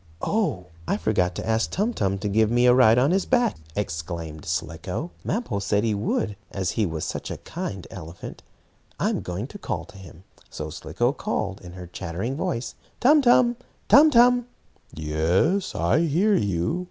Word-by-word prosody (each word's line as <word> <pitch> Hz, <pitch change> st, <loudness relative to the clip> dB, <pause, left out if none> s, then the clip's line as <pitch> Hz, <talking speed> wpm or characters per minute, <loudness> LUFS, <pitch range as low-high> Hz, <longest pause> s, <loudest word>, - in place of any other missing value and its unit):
"Oh, 200 Hz, -, 0 dB, 0.2 s
I -, -, +1 dB
forgot 90 Hz, -5 st, 0 dB
to -, -, -5 dB
ask 110 Hz, 0 st, +1 dB
Tum 215 Hz, +6 st, 0 dB
Tum 100 Hz, -, 0 dB
to 100 Hz, -, -3 dB
give 110 Hz, +2 st, +3 dB
me 120 Hz, +1 st, +3 dB
a 125 Hz, -, +7 dB
ride 125 Hz, -3 st, +6 dB
on 135 Hz, +5 st, +4 dB
his 190 Hz, +1 st, +1 dB
back!" 245 Hz, -3 st, +2 dB, 0.2 s
exclaimed 80 Hz, -5 st, -4 dB
Slicko. 85 Hz, -, -3 dB
"Mappo 195 Hz, -, -2 dB
said 100 Hz, +1 st, +1 dB
he 110 Hz, -2 st, +1 dB
would, 105 Hz, 0 st, -1 dB
as 95 Hz, -3 st, -2 dB
he 110 Hz, -3 st, 0 dB
was 80 Hz, -2 st, -4 dB
such -, -, -4 dB
a -, -, -4 dB
kind 105 Hz, -, -6 dB
elephant. 85 Hz, -1 st, -9 dB, 0.6 s
I'm -, -, 0 dB
going 90 Hz, +5 st, -4 dB
to 205 Hz, +10 st, -10 dB
call 85 Hz, -, -4 dB
to 95 Hz, -, -14 dB
him." 90 Hz, -1 st, -13 dB, 0.3 s
So 75 Hz, 0 st, -6 dB
Slicko 90 Hz, -, -1 dB
called, 100 Hz, -7 st, -3 dB
in 90 Hz, -1 st, -10 dB
her 90 Hz, -1 st, -8 dB
chattering 90 Hz, +8 st, -4 dB
voice: 155 Hz, -6 st, -3 dB, 0.3 s
"Tum 295 Hz, +4 st, +6 dB
Tum! 245 Hz, -1 st, +4 dB, 0.3 s
Tum 300 Hz, +3 st, +8 dB
Tum!" 245 Hz, -2 st, +5 dB, 0.4 s
"Yes, 80 Hz, -, 0 dB
I 85 Hz, -, +2 dB
hear 170 Hz, +6 st, +2 dB
you. 100 Hz, -, 0 dB
105 Hz, 175 wpm, -24 LUFS, -, 0.6 s, Tum